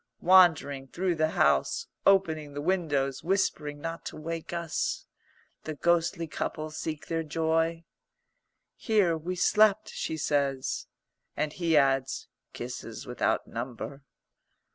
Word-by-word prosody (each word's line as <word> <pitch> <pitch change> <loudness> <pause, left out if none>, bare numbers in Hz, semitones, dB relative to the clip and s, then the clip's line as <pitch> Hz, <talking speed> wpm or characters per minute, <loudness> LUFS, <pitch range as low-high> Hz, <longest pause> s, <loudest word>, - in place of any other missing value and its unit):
Wandering 160 -7 +5
through 180 +6 -1
the 155 -1 +1
house, - - +2 0.2
opening 160 -7 +3
the 145 - -3
windows, 145 -7 0
whispering 160 -5 0
not 165 +2 -5
to - - -6
wake 165 +1 -5
us, 170 -2 -2 0.6
the 155 - -4
ghostly 170 +3 +1
couple 155 0 -4
seek 155 0 -5
their 165 0 -1
joy. 165 +1 0 0.9
"Here 205 -7 +2
we 170 +3 -4
slept," 215 +3 +4
she 160 - -3
says. 140 -3 -1 0.5
And 150 0 -1
he 165 -3 +2
adds, 135 -1 +2 0.2
"Kisses - - -7
without - - 0
number." 125 +4 -6
160 Hz, 120 wpm, -28 LUFS, 145-170 Hz, 0.9 s, Wandering